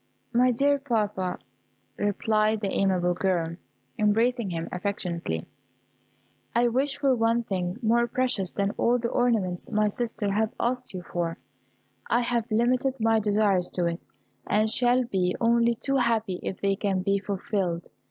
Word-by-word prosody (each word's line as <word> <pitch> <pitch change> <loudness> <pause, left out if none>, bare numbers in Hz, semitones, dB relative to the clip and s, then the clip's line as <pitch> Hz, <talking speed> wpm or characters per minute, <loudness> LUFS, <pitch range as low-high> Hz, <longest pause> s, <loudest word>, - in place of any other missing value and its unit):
"My 250 +2 +4
dear 280 +4 +2
papa," 210 -8 -1 0.6
replied 215 +1 +1
the 195 -2 -1
amiable 180 -2 +1
girl, 175 -3 -1 0.4
embracing 225 +1 +2
him 165 -2 -3
affectionately, 175 - -3 1.1
"I 240 0 +4
wish 270 +4 0
for 280 -2 +2
one 230 0 +2
thing 185 -3 -3
more 235 +2 +3
precious 240 -7 -1
than 200 0 0
all 240 +1 +3
the 235 -1 -2
ornaments 215 -8 0
my 210 0 +2
sisters 215 -2 -2
have 215 +2 0
asked 250 +1 -1
you 180 - -5
for; 170 -1 -3 0.7
I 240 - +3
have 235 -1 -1
limited 250 +4 +1
my 225 0 +3
desires 205 -3 +2
to 175 - +1
it, 170 +1 -2 0.5
and 215 +1 +2
shall 245 +3 +3
be 185 -6 0
only 235 0 +3
too 275 +4 0
happy 225 -6 0
if 190 - -5
they 195 0 +2
can 195 -2 -1
be 200 0 +1
fulfilled. 195 -3 -2
215 Hz, 150 wpm, -26 LUFS, 190-235 Hz, 1.1 s, My